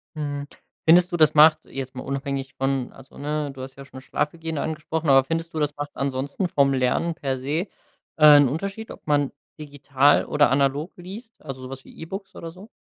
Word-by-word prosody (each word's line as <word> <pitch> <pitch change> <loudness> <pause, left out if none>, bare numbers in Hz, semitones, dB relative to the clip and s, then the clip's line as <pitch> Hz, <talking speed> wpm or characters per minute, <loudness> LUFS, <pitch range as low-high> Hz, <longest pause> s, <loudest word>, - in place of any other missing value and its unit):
Mhm. 145 -1 -4 0.4
Findest 175 +3 +6
du, 175 - -1
das 155 -2 +5
macht, 155 +1 +7
jetzt 135 -1 -7
mal 125 - -6
unabhängig 140 0 -4
von 135 -1 -1
also, 135 0 -16
ne, 150 0 -3
du 135 -1 -10
hast 130 0 -8
ja 140 - -10
schon 130 -1 -11
Schlafhygiene 160 +3 -3
angesprochen, 160 0 -3
aber 135 -1 +6
findest 165 +2 -3
du, 155 - -3
das 150 -1 -1
macht 145 0 -5
ansonsten 140 +6 -2
vom 140 -4 +2
Lernen 130 +6 +1
per 135 -5 -3
se, 150 +9 -2 0.5
äh, 150 -2 +9
‘n 145 -2 +5
Unterschied, 195 - -4
ob - - -13
man 145 -2 +1 0.3
digital 145 -1 +2
oder 145 -3 +3
analog 140 +4 0
liest, 200 +7 -10
also 135 -3 -8
so 130 - -8
was 135 0 -8
wie - - -16
E-Books 190 +4 -8
oder 165 - -7
so? 190 +5 -14
145 Hz, 200 wpm, -24 LUFS, 135-165 Hz, 0.5 s, äh